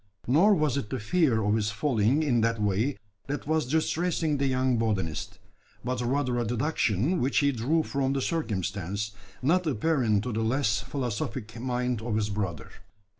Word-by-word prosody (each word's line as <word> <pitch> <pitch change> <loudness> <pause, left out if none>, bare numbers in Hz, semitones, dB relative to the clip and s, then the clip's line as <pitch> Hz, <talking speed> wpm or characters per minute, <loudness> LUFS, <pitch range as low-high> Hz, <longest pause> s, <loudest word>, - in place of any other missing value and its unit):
Nor 175 - +5
was 150 -5 +1
it 110 -7 -3
the 130 - -2
fear 125 -3 +2
of 105 +1 +2
his 110 -1 +1
falling 120 +3 +1
in 125 -6 +2
that 115 0 +1
way 105 +6 0 0.3
that 145 +1 -3
was 155 -3 0
distressing 160 +1 0
the 135 0 +1
young 130 -2 +1
botanist; 95 -4 -2 0.5
but 125 -1 -1
rather 125 0 0
a - - +1
deduction 120 - 0
which 130 +3 +1
he 140 -1 +4
drew 140 +7 +1
from 135 -2 -1
the 135 - -1
circumstance, 100 - -2 0.3
not 175 +5 +2
apparent 120 -6 +1
to 125 - -3
the 110 - -1
less 110 -3 +1
philosophic 120 -3 -4
mind 125 -2 -1
of 115 -1 -2
his 105 -1 0
brother. 95 -9 -3
125 Hz, 170 wpm, -28 LUFS, 110-145 Hz, 0.5 s, Nor